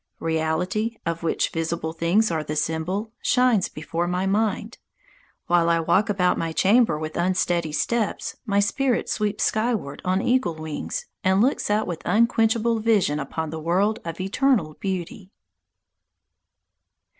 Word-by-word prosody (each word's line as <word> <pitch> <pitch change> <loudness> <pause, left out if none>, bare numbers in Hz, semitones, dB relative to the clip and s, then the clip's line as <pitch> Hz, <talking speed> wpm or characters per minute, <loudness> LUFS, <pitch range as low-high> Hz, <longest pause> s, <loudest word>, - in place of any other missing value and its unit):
Reality, 165 +8 -1
of 165 0 -2
which 165 - 0
visible 165 0 -2
things 175 +6 +2
are 160 -2 -1
the 150 0 -4
symbol, 165 +8 -2
shines 250 -6 +3
before 165 +3 -3
my 180 +2 -1
mind. 215 +2 -1 0.7
While 170 -1 +3
I 170 0 +3
walk 185 +6 +2
about 185 -3 +2
my 165 -1 -2
chamber 210 -1 +3
with 155 0 -5
unsteady 175 -2 0
steps, 220 +7 -1
my 200 -5 +1
spirit 245 +5 0
sweeps 210 -1 -1
skyward 215 - -1
on 185 +1 +1
eagle 245 -6 +1
wings 160 - -5 0.2
and 190 +1 +3
looks 250 +1 +1
out 210 +1 +2
with 170 -2 -5
unquenchable 225 +2 +2
vision 210 -9 +2
upon 155 +2 -4
the 160 - -5
world 190 +7 +1
of 165 0 -6
eternal 195 - +1
beauty. 190 0 -4
185 Hz, 140 wpm, -24 LUFS, 165-220 Hz, 0.7 s, shines